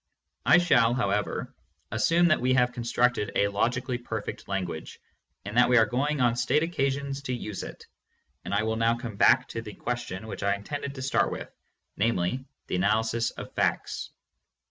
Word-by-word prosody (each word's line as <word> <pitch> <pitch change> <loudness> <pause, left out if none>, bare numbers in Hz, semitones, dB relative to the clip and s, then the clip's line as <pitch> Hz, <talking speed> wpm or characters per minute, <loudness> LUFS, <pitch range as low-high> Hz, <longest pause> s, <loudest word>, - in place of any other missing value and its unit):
I - - +8
shall, 120 -9 +4
how 120 -6 0
ever, 105 +1 -2 0.4
assume 165 +11 +3
that 155 - +3
we 130 +1 +3
have 125 -1 +3
constructed 120 -2 0
a 100 - +3
logically 120 +4 -1
perfect 110 -3 -5
language, 90 -5 -4 0.5
and 105 +2 -6
that 125 0 +6
we 125 - +5
are 115 - +6
going 140 +7 -1
on 120 -1 +3
state 150 +5 +2
occasions 140 -4 -1
to 130 -2 -3
use 105 -4 -5
it, - - -9 0.6
and - - -6
I 100 +2 +2
will 110 0 -1
now 115 +1 +2
come 115 -3 -6
back 125 +5 +5
to 115 - -4
the 105 -3 -9
question 120 -5 -4
which 110 - -7
I 100 0 +2
in 100 - -10
tended 140 +2 -5
to 130 - -6
start 135 - +2
with, - - -6 0.4
namely, 115 +3 0 0.2
the - - -2
analysis 110 +4 +1
of - - -9
facts. - - -1
120 Hz, 185 wpm, -27 LUFS, 105-130 Hz, 0.6 s, I